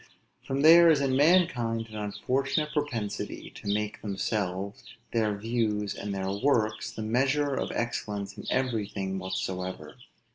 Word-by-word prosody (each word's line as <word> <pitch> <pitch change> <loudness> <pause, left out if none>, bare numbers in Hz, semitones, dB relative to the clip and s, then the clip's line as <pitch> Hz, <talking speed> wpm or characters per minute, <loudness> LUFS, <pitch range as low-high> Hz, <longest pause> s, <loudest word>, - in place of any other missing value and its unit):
For 135 0 -2
there 165 +3 +8
is 155 -3 +5
in 135 -2 +1
mankind 130 -8 +3
an 110 - -8
unfortunate 135 +8 -1
propensity 125 -9 -3
to 100 - -4
make 105 0 -2
themselves, 100 -1 -2 0.3
their 110 -3 +1
views, 105 -2 -1
and 100 0 -5
their 95 -1 -2
works, 110 -1 +1
the 115 -1 -6
measure 135 +6 +1
of - - -2
excellence 105 -4 -3
in - - -9
everything 105 -7 -1
whatsoever. 95 +3 -4
110 Hz, 135 wpm, -28 LUFS, 100-135 Hz, 0.3 s, there